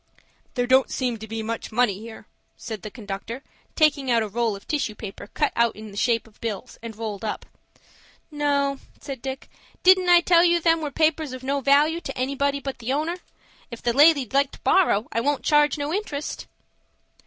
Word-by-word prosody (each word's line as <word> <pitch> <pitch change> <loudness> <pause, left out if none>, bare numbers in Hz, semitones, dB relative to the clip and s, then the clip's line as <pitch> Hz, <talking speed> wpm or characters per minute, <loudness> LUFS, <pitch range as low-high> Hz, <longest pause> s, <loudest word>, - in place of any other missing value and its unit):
"There 245 -1 +1
don't 260 +1 +4
seem 250 -3 -2
to 220 - -8
be 220 0 -4
much 230 +1 -4
money 215 -4 +1
here," 220 0 -10 0.3
said 220 -3 -7
the 215 - -7
conductor, 220 +3 -7 0.3
taking 285 -4 +2
out 230 -2 +3
a - - -3
roll 225 0 -1
of 195 - -13
tissue 275 -8 -1
paper 200 -2 -8
cut 295 +7 -1
out 235 -1 +2
in 215 0 -10
the - - -12
shape 230 +2 +1
of 220 -2 -22
bills, 230 +1 -5
and 230 -1 -7
rolled 215 -2 -5
up. 215 - -4 0.9
"No," 280 -2 0 0.2
said 270 -4 -7
Dick. 265 0 -6 0.4
"Didn't 370 -1 +6
I 350 -1 +7
tell 345 -1 +5
you 345 -1 +4
them 330 -1 +2
were 300 - -2
papers 310 -1 0
of 255 0 -8
no 275 +1 -1
valoo 295 +5 +3
to - - -7
anybody 280 +2 0
but 270 -2 -6
the 240 +2 -3
owner? 310 +5 -1 0.5
If 235 -2 -9
the 240 - +1
lady'd 285 -3 +5
like 275 0 +3
to - - -12
borrow, 250 - +3
I 230 - 0
won't 285 +1 0
charge 295 0 +3
no 290 +2 -3
interest." 310 -8 -4
265 Hz, 200 wpm, -24 LUFS, 230-295 Hz, 0.9 s, I